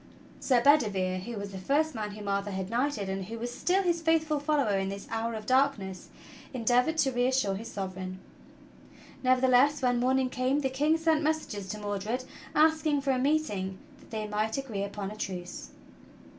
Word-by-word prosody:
Sir 245 -3 +2
Bedivere 200 -10 +3
who 235 +5 -6
was 200 0 -5
the 190 - -6
first 300 +10 +1
man 215 -3 -3
whom 205 -1 -8
Arthur 200 0 0
had 190 0 -4
knighted, 245 -4 0
and 190 0 -3
who 230 +4 -6
was 240 +1 -4
still 380 +2 +2
his 340 -2 +1
faithful 315 -2 +2
follower 285 -8 +1
in 195 0 -1
this 200 0 -6
hour 225 0 -2
of 215 -1 -6
darkness, 255 -8 +1 0.5
en 235 -3 -4
deavored 250 +7 +3
to 270 - 0
reassure 245 -4 +1
his 215 +4 -6
Sovereign. 185 -1 -5 1.0
Nevertheless, 255 +2 +4
when 245 -1 +3
morning 260 +1 +2
came 260 +3 +1
the 265 - 0
King 300 +4 +2
sent 320 -1 +2
messengers 300 -11 -2
to 215 - -4
Mordred 210 +4 -3 0.3
asking 310 -1 +3
for 275 0 +1
a 255 - +1
meeting 250 -10 0 0.2
that - - -19
they 215 -1 -3
might 215 +2 -1
agree 240 -8 -3
upon 200 0 -5
a - - -7
truce. 180 -4 -6
240 Hz, 185 wpm, -29 LUFS, 200-280 Hz, 1.0 s, Nevertheless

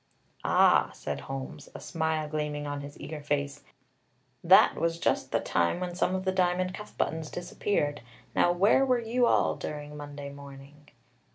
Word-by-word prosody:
"Ah," - - +4
said - - -4
Holmes, 135 +1 -7
a - - -6
smile 160 -2 -1
gleaming 150 -1 -3
on 145 0 -4
his 145 0 -10
eager 155 -1 -6
face, 145 -1 -2 0.8
"that - - +7
was 165 0 0
just - - 0
the - - +2
time 85 - 0
when 180 -1 -3
some 180 +1 0
of 190 0 -3
the 190 - +2
diamond 185 0 +1
cuff 210 +2 -10
buttons 160 -1 -1
disappeared. 160 -5 -2 0.3
Now, 175 - +4
where 200 +9 +4
were 255 -2 +3
you 235 +1 +1
all - - +3
during 150 0 -6
Monday 145 -1 -7
morning?" 140 +1 -13
155 Hz, 165 wpm, -29 LUFS, 145-180 Hz, 0.8 s, that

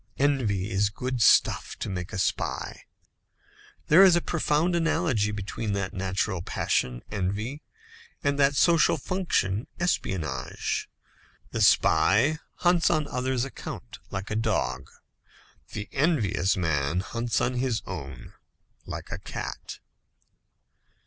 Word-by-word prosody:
Envy 115 -9 +1
is 100 0 +2
good 125 +3 -3
stuff - - +4
to - - -4
make 90 -1 -4
a 110 - -4
spy. - - -2 1.0
There 165 +6 +7
is 185 -3 +7
a - - +4
profound 170 0 +1
analogy 160 - +1
between 105 +1 -3
that 100 0 -2
natural 95 -2 -1
passion, 60 -6 -1
envy, 105 +8 -3 0.6
and 140 -1 +1
that 140 0 +4
social 165 +2 +4
function, 135 - -1
espionage. 85 - -2 0.6
The - - -2
spy 100 - +4 0.2
hunts 175 -1 +3
on 155 -3 +1
others' 125 0 -1
account, 135 - -8
like 95 +1 -5
the 105 - -2
dog. 85 - -1 0.8
The 105 0 -5
envious 110 - +1
man 80 -1 0
hunts 115 +1 -2
on 125 - 0
his 125 -3 -1
own, 70 -9 -8 0.5
like - - -6
the - - -5
cat. - - -6
110 Hz, 120 wpm, -27 LUFS, 95-145 Hz, 1.0 s, There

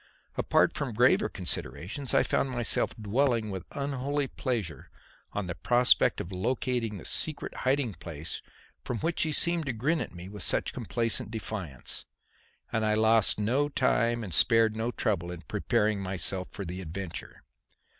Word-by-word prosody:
Apart - - +3
from - - -3
graver - - +4
considerations, 125 - -1
I - - +6
found 135 - +1
myself 120 -3 +1
dwelling 115 0 +1
with 95 -2 -6
unholy 140 +1 -1
pleasure 110 - -3 0.4
on 105 - -2
the 90 - -3
prospect 120 +7 +4
of 85 - -5
locating 115 +2 -1
the - - -10
secret 155 -2 -1
hiding 130 -4 +1
place 80 -1 -6 0.4
from 125 - -2
which 165 +2 0
he 160 - +2
seemed 170 0 +1
to 130 - 0
grin 145 +9 +1
at - - -4
me 85 +1 -8
with 105 0 -5
such - - +1
complacent 115 -1 -2
defiance; 105 - -5 0.7
and 110 - +1
I 110 0 +3
lost 110 0 +4
no 130 +8 +2
time 120 -4 +2
and 95 -5 -6
spared 115 +3 +5
no 110 +2 -1
trouble 95 -7 -1
in 90 -2 -7
preparing 105 -1 +1
myself 95 0 -2
for 100 - -6
the 90 +2 -5
adventure. 90 +1 -6
110 Hz, 155 wpm, -29 LUFS, 95-130 Hz, 0.7 s, I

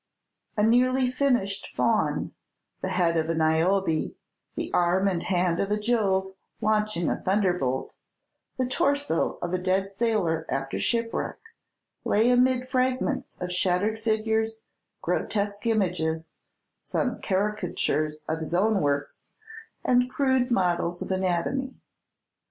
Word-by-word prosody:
A 210 - +3
nearly 250 +3 +3
finished 245 -8 0
Faun, - - +1 0.5
the - - -2
head 170 -2 +1
of 160 0 0
a 165 - +1
Niobe, 160 +2 +1 0.4
the - - -4
arm 180 +3 +3
and 180 -3 0
hand 175 -2 +1
of 200 - 0
a 210 - +1
Jove 200 -4 +1 0.3
launching 215 -5 +1
a - - 0
thunderbolt, 180 -10 0 0.6
the 260 - +1
torso 280 - 0
of 175 +1 -3
a 185 - +1
dead 190 +2 0
sailor 195 -7 0
after 135 0 -2
shipwreck, 230 -1 -1 0.7
lay 225 +4 +3
amid 250 0 +3
fragments 255 -1 -1
of 180 0 -4
shattered 185 +4 +1
figures, 220 0 0 0.4
grotesque 205 +1 -1
images, 170 -7 -1 0.4
some - - -2
caricatures 180 -7 -1
of 160 0 -1
his 160 +2 -3
own 205 +2 +2
works, 145 0 -2 0.5
and 250 0 +3
crude 260 -2 +1
models 175 -5 0
of - - -6
anatomy. 190 +9 -1
195 Hz, 125 wpm, -26 LUFS, 175-230 Hz, 0.7 s, A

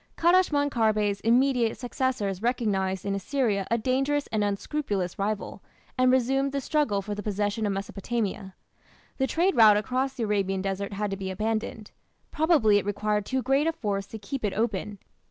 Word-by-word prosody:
Kadashman 330 -5 +3
Kharbe's 215 -4 +1
immediate 240 0 +2
successors 245 -6 -2
recognized 195 -6 -1
in 200 - -1
Assyria 200 -1 -1
a 230 - +2
dangerous 270 +5 0
and 215 -1 +1
unscrupulous 200 - -2
rival, 205 +1 -3 0.3
and 255 0 +4
resumed 270 +2 +1
the 280 - 0
struggle 260 -8 0
for 210 - -4
the 205 - -5
possession 205 +1 -1
of - - 0
Mesopotamia. 195 0 -3 0.6
The 265 - +2
trade 360 +6 +1
route 215 -3 +7
across 260 +5 -1
the 245 - -3
Arabian 195 -3 0
desert 195 +1 -3
had 205 0 -2
to 195 - -3
be 190 -1 -4
abandoned. 215 +2 -3 0.4
Probably 290 -11 +4
it - - -6
required 210 0 -1
too 260 -1 -1
great 275 +4 +2
a - - +3
force 200 -8 -3
to 220 - -8
keep 220 +5 -6
it 205 - 0
open. 210 -1 -2
215 Hz, 170 wpm, -27 LUFS, 200-260 Hz, 0.6 s, route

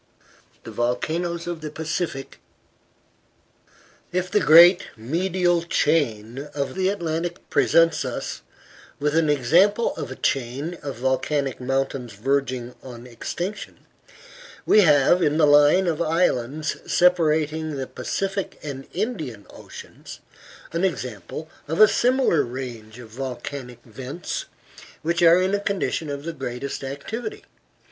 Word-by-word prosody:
VOLCANOES 165 +8 -2
OF 175 -2 -5
THE 155 - -5
PACIFIC 155 -2 -4 1.7
If 180 0 -2
the 210 - +4
great 170 +3 +7
medial 175 +7 0
chain 140 -6 0
of 140 -1 -2
the 185 0 +1
Atlantic 175 -2 -3
presents 165 0 +3
us - - -5 0.6
with 150 +1 0
an 160 -2 +3
example 175 - +3
of - - -5
a 130 - -6
chain 135 +7 -2
of 140 -2 -5
volcanic 130 +2 -1
mountains 135 -2 -2
verging 130 +1 -1
on 120 -2 -10
extinction, 175 - -6 0.8
we 215 - +6
have 150 +1 +5
in 150 -2 +2
the 160 - +5
line 145 +5 +5
of 170 -2 -1
islands 155 -3 0
separating 160 -3 +2
the 135 -1 -3
Pacific 195 +7 -3
and 135 -2 -6
Indian 160 - -4
Oceans - - -11 0.5
an 170 +2 -2
example 125 - -3 0.2
of 160 +2 -3
a 215 - +9
similar 250 - +2
range 120 -3 -7
of 120 -3 -11
volcanic 125 0 -6
vents 130 +8 -6 0.6
which 170 +2 0
are 170 +1 +7
in 185 +2 +1
a 205 - +2
condition 195 -6 -2
of 140 0 -5
the 170 +1 -4
greatest 135 -1 -5
activity. 225 - -6
150 Hz, 125 wpm, -23 LUFS, 130-175 Hz, 1.7 s, a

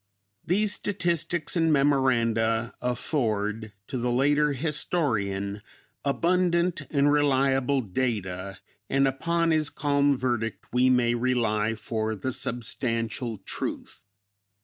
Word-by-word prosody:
These 205 +3 +2
statistics 175 -4 -1
and 165 -2 +2
memoranda 115 -5 +2
afford 110 -4 -1
to 130 - -4
the 125 +1 -1
later 145 +4 +2
historian 115 - -1 0.4
abundant 170 +5 +1
and 145 -1 +3
reliable 135 -2 +2
data, 100 -4 -3 0.3
and 135 0 +3
upon 165 +5 0
his 155 -2 +2
calm 140 -1 +1
verdict 120 -3 -2
we 125 +1 +4
may 125 -2 +3
rely 115 -3 0
for 110 -1 -3
the 120 +6 -3
substantial 115 -1 -2
truth. - - -5
130 Hz, 105 wpm, -26 LUFS, 115-145 Hz, 0.4 s, we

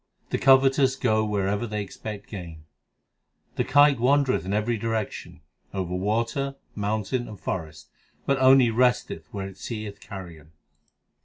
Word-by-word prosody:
The - - 0
covetous 135 0 +5
go 110 -5 +1
wherever 105 +1 -1
they 105 -1 -3
expect 100 +1 -8
gain: 85 -6 -9 0.9
The - - +1
kite 145 -2 +5
wandereth 135 - +2
in 95 - -3
every 110 +3 0
direction 110 -6 -4 0.3
over 90 -2 -2
water, 115 +8 -1 0.2
moun 105 +1 -1
tain, 120 +4 -2
and 105 -3 -10
forest, 80 -5 -5 0.4
But 140 -1 +1
only 130 -2 +6
resteth 120 -9 0
where 100 -1 -4
it 95 -1 -12
seeth 105 -2 -6
carrion. 85 -7 -10
110 Hz, 140 wpm, -25 LUFS, 95-125 Hz, 0.9 s, only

